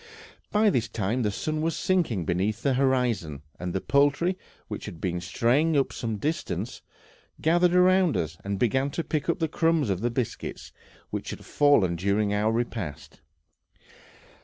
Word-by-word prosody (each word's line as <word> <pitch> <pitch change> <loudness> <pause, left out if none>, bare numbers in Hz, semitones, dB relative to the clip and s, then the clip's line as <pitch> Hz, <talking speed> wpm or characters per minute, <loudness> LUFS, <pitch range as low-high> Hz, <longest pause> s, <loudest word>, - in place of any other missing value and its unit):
By 210 0 +4
this 120 -6 0
time 110 +2 -1
the 105 - +1
sun 155 +9 -2
was 165 0 -1
sinking 160 - 0
beneath 95 +6 -1
the 140 - +2
horizon, 125 - 0 0.2
and 90 0 -3
the 95 - -1
poultry, 145 +6 +2 0.3
which - - -6
had 80 - -8
been 90 0 -2
straying 130 - +2
to 140 -2 +3
some 115 -2 -3
little 105 - -5
distance, 155 +2 -3 0.6
gathered 175 +2 +3
round 185 -1 +4
us, 80 0 -2
and 100 0 -2
began 130 +6 +1
to 170 - 0
pick 155 +1 -2
up 170 - +2
the 160 - 0
crumbs 160 -6 +1
of 95 0 -2
biscuits 125 -4 -4 0.4
which - - -4
had - - -7
fallen 115 -13 +3
during 100 +3 +1
our 105 +2 +2
repast. 110 -12 -4
125 Hz, 160 wpm, -26 LUFS, 100-155 Hz, 0.6 s, By